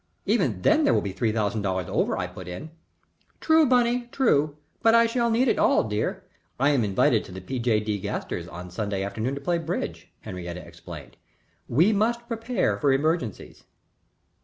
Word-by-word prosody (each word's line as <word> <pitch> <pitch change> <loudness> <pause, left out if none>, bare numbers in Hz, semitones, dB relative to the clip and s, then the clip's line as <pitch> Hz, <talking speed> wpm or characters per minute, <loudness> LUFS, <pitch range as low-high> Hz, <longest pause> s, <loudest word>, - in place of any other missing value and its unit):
"Even - - +1
then 315 0 +4
there 285 - +4
will - - +2
be 100 - -4
three 110 +4 0
thousand 110 0 -1
dollars 95 -2 -1
over," - - 0
I - - -1
put - - -9
in. 115 - -7 0.7
"True, 320 -1 +4
Bunny, 245 -1 +2
true. 150 - +2 0.2
But 225 0 +5
I 230 0 +6
shall 235 0 +1
need 235 +3 +2
it - - +2
all, - - +4
dear. 105 -1 -2 0.4
I 140 +3 +4
am 135 -5 +2
invited 100 -2 +2
to - - -11
the 95 - -7
P. 125 +8 -5
J. 115 -2 +2
D. 105 -1 -2
Gasters - - -4
on 90 +1 -9
Sunday 100 0 -2
afternoon 110 +7 -3
to 140 - -6
play 170 +4 0
bridge," 165 - -4
Henriette 90 -1 -6
explained. 90 - -11 0.5
"We 170 - +4
must 235 +3 0
prepare 225 - -1
for 140 - +3
emergencies." 145 - -1
135 Hz, 185 wpm, -25 LUFS, -, 0.7 s, I